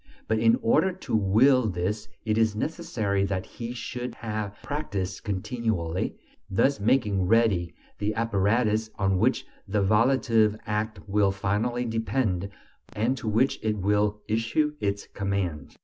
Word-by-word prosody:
but 110 0 +1
in 115 0 +5
order 185 +11 +3
to 185 -9 -4
will 110 +5 +4
this 95 +4 -2 0.2
it 110 -1 +1
is 110 -1 +2
necessary 110 -8 -1
that 95 -1 -2
he 115 -1 -7
should 125 0 -5
have 105 -3 -4
practised 100 -11 -3
continually, 100 -4 -2 0.3
thus 120 +6 +2
making 105 -4 +2
ready 100 -6 +2 0.2
the 105 +1 0
apparatus 110 0 +1
on 95 -2 +1
which 125 +6 +2 0.2
the 100 0 +1
volitive 110 0 +3
act 105 +1 -2
will 100 -1 +3
finally 105 +6 -1
depend, 110 -4 -1 0.4
and 115 +5 +1
to 120 - -7
which 115 +5 +2
it 110 -1 0
will 105 +1 +1
issue 115 +8 +1
its 100 -1 -2
commands. 95 -7 -3
105 Hz, 135 wpm, -26 LUFS, 100-115 Hz, 0.4 s, in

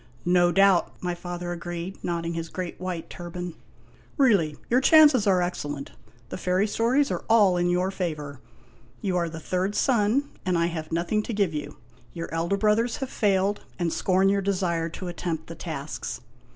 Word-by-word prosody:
" - - -29 0.2
No 175 0 +4
doubt," 195 -1 +4
my 180 -1 -2
father 175 0 -5
agreed, 175 +1 -6
nodding 170 -1 -2
his 165 0 -4
great 180 -2 -5
white 180 -3 -4
turban. 175 0 -6 0.3
" - - -29 0.3
Really, 195 - +3
your 250 +2 +3
chances 290 -7 +6
are 185 -2 +4
excellent. 145 -5 -4 0.4
The - - -6
fairy 185 +2 +1
stories 240 +7 +1
are - - -3
all 210 -5 +5
in 175 0 +1
your 180 +2 +1
favor. 150 -7 -4 0.6
You 190 -3 -1
are 170 -1 0
the 160 0 -7
third 185 +5 -1
son, 240 +1 +2 0.2
and 185 -2 +1
I 170 - +2
have 165 -2 -4
nothing 175 +6 0
to 230 - -5
give 200 -5 +1
you; 150 -1 -5 0.4
your 165 -1 -5
elder 170 +4 0
brothers 220 +3 +2
have 265 -2 -5
failed, 200 -1 +1
and 170 -2 -1
scorn 190 +1 +2
your 200 0 +2
desire 180 -4 0
to 180 +2 -7
attempt 170 -2 -4
the 165 - -8
tasks. 155 -4 -5
180 Hz, 180 wpm, -26 LUFS, 170-200 Hz, 0.6 s, chances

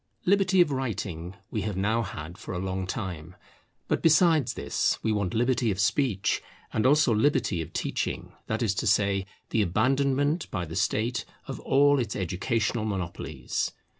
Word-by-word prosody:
Liberty 190 -1 +4
of 165 -4 +3
writing 100 -9 -3 0.2
we 110 - -1
have 105 -3 -3
now 110 +4 +1
had 85 -5 -6
for 95 - -7
a - - -2
long 95 0 -3
time. 90 -5 -5 0.5
But - - 0
besides 160 -4 +4
this - - 0
we 110 - +1
want 100 -3 -1
liberty 120 0 +2
of 95 -2 -1
speech; 105 -1 +1 0.3
and 110 +3 +2
also 145 -3 +4
liberty 105 - +2
of 80 - -7
teaching; - - -3
that 110 +2 -1
is 105 -4 +2
to 115 - -2
say, 100 -1 +2 0.2
the 110 - +2
abandonment 135 - +1
by 90 -4 -3
the 80 - -7
State 110 +5 0 0.2
of - - -5
all 145 +1 +4
its 115 -4 -2
educational 105 +5 -1
monopolies. 95 -5 -3
110 Hz, 165 wpm, -27 LUFS, 95-135 Hz, 0.5 s, Liberty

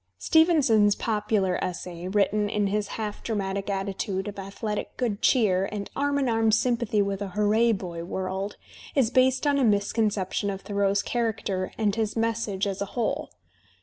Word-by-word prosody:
Stevenson's 260 - +4
popular 210 -4 0
essay, 180 -1 -5
written 205 +1 +1
in 210 0 0
his 205 +1 0
half 210 -2 -4
dramatic 200 -2 -2
attitude 195 0 -2
of 205 -1 -6
athletic 205 +2 -5
good 225 -5 -1
cheer 195 -7 +3
and 205 -1 -5
arm 285 0 +1
in 275 -2 +1
arm 225 -1 +2
sympathy 225 -2 +2
with 200 0 -3
a 200 - -2
hooray 215 +3 +3
boy 175 -5 -4
world, 190 +3 -4 0.4
is 255 -5 +3
based 260 +1 +3
on 285 -1 +3
a - - +2
misconception 205 -2 +1
of 195 -1 -4
Thoreau's 200 -1 0
character 215 -5 -2
and 210 -2 +1
his 220 -2 -1
message 225 -3 0
as 200 0 -3
a - - 0
whole. 235 - -1
205 Hz, 160 wpm, -26 LUFS, 195-225 Hz, 0.4 s, Stevenson's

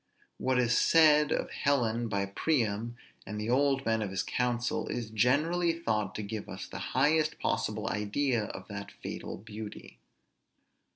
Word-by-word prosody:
What 130 -1 +1
is 120 -2 +3
said 150 -2 +5
of - - -1
Helen 120 -4 +1
by 100 -2 0
Priam 115 0 -1 0.3
and 105 +1 -4
the 110 +2 -2
old 135 +1 +2
men 115 0 +1
of 105 - -2
his 95 0 -1
council, 120 -1 -1
is 115 -3 -4
generally 155 +10 +2
thought 110 - -1
to 105 - -3
give 105 +1 -5
us - - -6
the - - -7 0.2
highest 155 0 +3
possible 110 +1 -1
idea 110 +3 0
of - - -8
that - - -6
fatal - - -5
beauty. 105 0 -9
120 Hz, 155 wpm, -30 LUFS, 105-140 Hz, 0.3 s, said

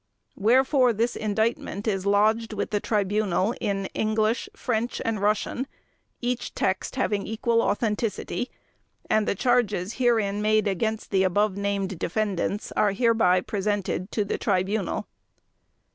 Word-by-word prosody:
Wherefore, 255 +3 +4
this 230 +3 0
Indictment 220 0 -1
is 195 -2 0
lodged 215 +3 +2
with 205 - -3
the 205 - +1
Tribunal 205 -1 +1
in 195 -1 -1
English, 215 +1 0
French, 240 -1 -2
and 220 -3 -1
Russian, 215 +5 0 0.5
each 245 0 -2
text 190 +5 -1
having 205 -6 0
equal 230 +1 +1
authenticity, 225 +3 -1 0.6
and 215 -1 +3
the - - +1
charges 235 -3 +1
herein 215 -4 +2
made 215 0 +2
against 220 +3 -2
the 190 -2 +3
above 190 +2 +2
named 200 -2 -2
defendants 205 +2 -1
are 205 -2 +2
hereby 220 -5 +3
presented 205 -2 -2
to 210 - 0
the - - -2
Tribunal. 195 0 0
210 Hz, 130 wpm, -25 LUFS, 200-225 Hz, 0.6 s, Wherefore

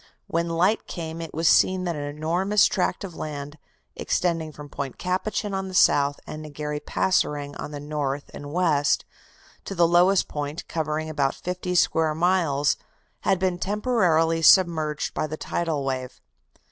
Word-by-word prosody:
When 170 - -1
light 180 +6 +1
came 165 -1 -5
it 165 - -6
was 165 +1 0
seen 185 +3 +4
that 175 -2 -2
an 145 - -4
enormous 165 +8 +1
tract 180 0 0
of 190 -3 -6
land, 145 0 -6 0.4
extending 165 -3 -1
from 150 -1 -10
Point 140 -2 -6
Capucin 195 +3 -2
on 190 0 -2
the 185 - -7
south, 140 -4 +4
and 155 0 -7
Negery 150 0 -5
Passoerang 145 -6 0
on - - -6
the 145 -1 -6
north 145 -1 -3
and 145 0 -8
west, 155 -4 +2 0.6
to 195 - -5
the 170 -1 +4
lowest 175 +3 +4
point, 145 +1 -5
covering 155 -1 -2
about 145 -3 0
fifty 180 0 -4
square 160 -3 +2
miles, 160 -5 +2 0.4
had 190 - +1
been 180 -1 -1
temporarily 180 -7 +2
submerged 160 -4 +4
by - - -1
the 155 +1 -5
'tidal 160 -5 -2
wave. 130 -2 -4
160 Hz, 160 wpm, -25 LUFS, 150-180 Hz, 0.6 s, seen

